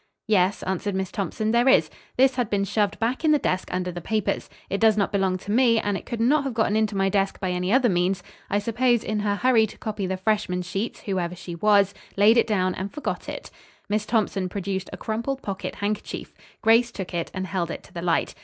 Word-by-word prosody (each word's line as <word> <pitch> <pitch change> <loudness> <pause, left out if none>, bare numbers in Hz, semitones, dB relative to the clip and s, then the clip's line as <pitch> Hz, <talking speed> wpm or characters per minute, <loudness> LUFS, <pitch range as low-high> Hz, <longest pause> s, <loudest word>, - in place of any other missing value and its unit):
"Yes," 195 -2 +2
answered 190 +2 -2
Miss 190 -1 -2
Thompson, 215 +2 -2
"there 240 +3 +4
is. - - +5 0.3
This 265 +1 +5
had 245 -4 -1
been 200 -1 +1
shoved 205 +1 0
back 240 +6 -1
in 310 - +4
the - - +5
desk 185 -9 -1
under 180 0 -2
the 175 0 -6
papers. 215 +3 -1 0.2
It 195 - -3
does 220 -1 +5
not 200 - +1
belong 190 -2 +1
to 200 +2 -7
me, 230 0 +4
and 205 -2 -1
it - - -6
could 235 -2 -4
not 275 +6 +3
have 270 -4 -4
gotten 220 -2 +2
into 215 -2 +1
my 195 0 +2
desk 195 0 0
by 185 -2 -1
any 180 +1 -1
other 255 +1 +4
means. 180 -1 +1 0.3
I 205 - +1
suppose, 235 +3 +1
in 215 -1 -1
her 205 -1 0
hurry 235 -1 +4
to - - -13
copy 210 -3 -3
the 190 0 -2
freshmen 190 -2 0
sheets, 195 +6 -4
whoever 180 -3 -2
she 175 0 -8
was, 200 +2 +3 0.2
laid 215 +4 +6
it 230 - +4
down 185 -4 +1
and 190 +2 -5
forgot 300 - -4
it." - - -7 0.4
Miss 210 +1 0
Thompson 200 -5 0
produced 190 -1 -3
a - - -7
crumpled 235 +5 -3
pocket 195 -2 -4
handkerchief. 210 +1 -4 0.3
Grace 230 +2 +5
took 190 -5 -6
it 170 -1 -2
and 185 0 -4
held 185 -3 -2
it - - -6
to - - -18
the 170 - -5
light. 170 -1 0
205 Hz, 230 wpm, -25 LUFS, 185-225 Hz, 0.4 s, laid